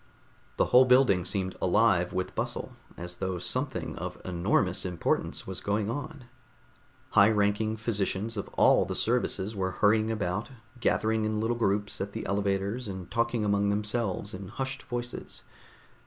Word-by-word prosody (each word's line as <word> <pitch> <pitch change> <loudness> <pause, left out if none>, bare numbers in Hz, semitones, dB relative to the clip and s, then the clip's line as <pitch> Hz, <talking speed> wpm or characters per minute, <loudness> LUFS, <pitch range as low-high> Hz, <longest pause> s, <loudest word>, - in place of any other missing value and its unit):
The - - +3
whole 130 +1 +8
building 125 -8 +4
seemed 95 -2 -1
alive 95 -2 +3
with 95 0 -3
bustle, - - -3 0.2
as 90 +1 -6
though 95 -1 -2
something - - -2
of - - -5
enormous 85 -1 +1
importance 90 -3 -1
was 95 -1 -5
going 105 +1 0
on; 145 0 -6 0.9
high 100 0 +6
ranking 105 +1 +1
physicians 110 0 -1
of 100 - -4
all - - +5
the - - -4
services 105 +4 0
were 95 -1 -1
hurrying 110 +3 +2
about, 105 0 -2 0.3
gathering 110 -1 +1
in 110 0 -1
little 115 +2 0
groups 105 -3 -1
at 100 +1 -4
the - - -5
elevators 100 +4 -1
and 95 -3 -7
talking 115 -1 0
among 100 0 +2
themselves 105 -1 -1
in 95 +1 -7
hushed 130 +5 -4
voices. 120 -1 -6
105 Hz, 150 wpm, -28 LUFS, 95-115 Hz, 0.9 s, whole